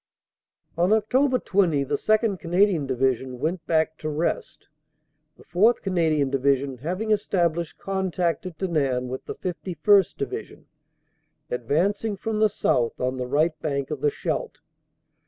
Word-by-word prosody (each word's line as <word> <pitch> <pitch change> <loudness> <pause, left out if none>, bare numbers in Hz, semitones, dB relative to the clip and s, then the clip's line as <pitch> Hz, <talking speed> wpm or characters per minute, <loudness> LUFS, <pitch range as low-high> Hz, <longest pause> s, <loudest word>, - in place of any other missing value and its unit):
On 175 +2 +3
Oct. 250 +5 +2
20 170 -8 +2
the 135 - -5
2nd. 215 -3 +1
Canadian 175 -3 +2
Division 130 -1 0
went 160 +6 -2
back 160 -1 +1
to 155 - -3
rest, 155 +3 -3 0.7
the - - -16
4th. 210 +7 +2
Canadian 160 -7 +1
Division 135 -1 +1
having 185 - -2
established 170 -5 0
contact 185 -2 -1
at 170 -4 -9
Denain 140 -9 0
with 130 +1 -5
the - - -6
51st. 185 +1 +1
Division, 140 - -6 0.9
advancing 185 - 0
from 215 +2 -2
the 215 0 +4
south 125 - 0
on 130 +1 -1
the 125 -1 -3
right 155 +5 +2
bank 140 -2 -2
of 150 -3 -4
the 150 - +3
Scheldt. - - -3
165 Hz, 135 wpm, -25 LUFS, 140-195 Hz, 0.9 s, the